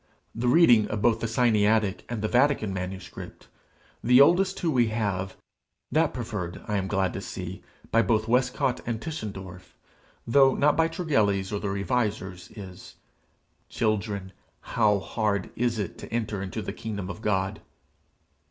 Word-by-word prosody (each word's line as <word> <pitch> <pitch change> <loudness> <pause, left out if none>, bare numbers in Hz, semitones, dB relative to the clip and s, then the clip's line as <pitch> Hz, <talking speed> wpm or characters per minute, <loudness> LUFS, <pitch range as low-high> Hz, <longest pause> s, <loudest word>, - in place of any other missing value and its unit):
The 120 +2 -2
reading 120 -6 +6
of 105 -1 -3
both 115 -2 +3
the 115 - -2
Sinaitic 110 -3 +2
and 115 -3 -4
the - - +2
Vatican 125 -4 +2
manuscript, 95 0 -7 0.6
the 125 +2 +6
oldest 185 +7 +5
two 170 - 0
we 125 -4 +3
have, 100 -4 -2 0.5
that 155 +4 +2
preferred, 105 -8 -5
I 105 - 0
am 95 -1 -1
glad 95 -2 0
to 95 - -4
see, 95 -1 -6 0.3
by 115 - +5
both 110 -2 +1
Westcott 125 +1 +1
and 115 -2 -2
Tischendorf, 100 - -7 0.5
though 135 +2 +5
not 150 +1 +3
by 165 +1 +3
Tregelles 110 - 0
or 105 - -1
the 100 - -3
Revisers, 100 -3 -2
is, 95 -4 -10 0.7
"Children, 105 -3 -1 0.4
how 105 -3 +4
hard 100 +1 -2
is 120 -1 0
it 100 -4 -4
to - - -10
enter 110 -4 -2
into 95 -2 -4
the - - -5
kingdom 100 -4 -5
of 100 +3 -7
God!" 95 -3 -1
110 Hz, 150 wpm, -26 LUFS, 95-120 Hz, 0.7 s, reading